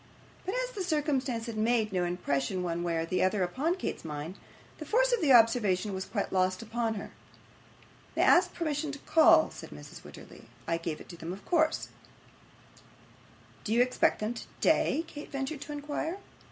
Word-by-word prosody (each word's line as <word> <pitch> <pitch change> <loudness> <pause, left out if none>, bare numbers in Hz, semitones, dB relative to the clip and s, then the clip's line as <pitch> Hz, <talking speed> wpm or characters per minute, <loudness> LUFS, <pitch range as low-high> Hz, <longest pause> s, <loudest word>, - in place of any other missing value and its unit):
But 385 - -1
as - - -1
the 410 -6 -4
circumstance 280 -8 0
had 230 -3 -5
made 220 -1 +1
no 180 -1 +1
impression 175 -1 -1
one 170 -1 -2
way 170 -1 -1
or 165 0 -1 0.2
other 190 +1 +2
upon 275 - 0
Kate's 375 - -4
mind, 155 +3 -5 0.4
the - - -6
force - - +3
of 475 - +2
the 295 -4 +3
observation 220 -5 +4
was 190 0 -3
quite 200 -3 -3
lost 185 +2 +1
upon 225 0 -2
her. 200 - -7 1.0
'They - - +1
asked - - +5
permission 305 -2 -2
to - - -6
call,' 325 0 +6
said - - -10
Mrs. - - -11
Wititterly. - - -13 0.2
'I 165 - +1
gave 165 -2 -4
it - - -13
them 165 +2 -5
of 190 +2 -9
course.' 315 -2 +1 1.7
'Do 215 - -4
you 240 +1 +6
expect 250 0 +2
them 215 +2 -2
today?' 300 +6 +1
Kate 295 -2 -10
ventured 275 +1 -3
to - - -7
inquire. 295 +4 -3
235 Hz, 175 wpm, -30 LUFS, 185-305 Hz, 1.7 s, call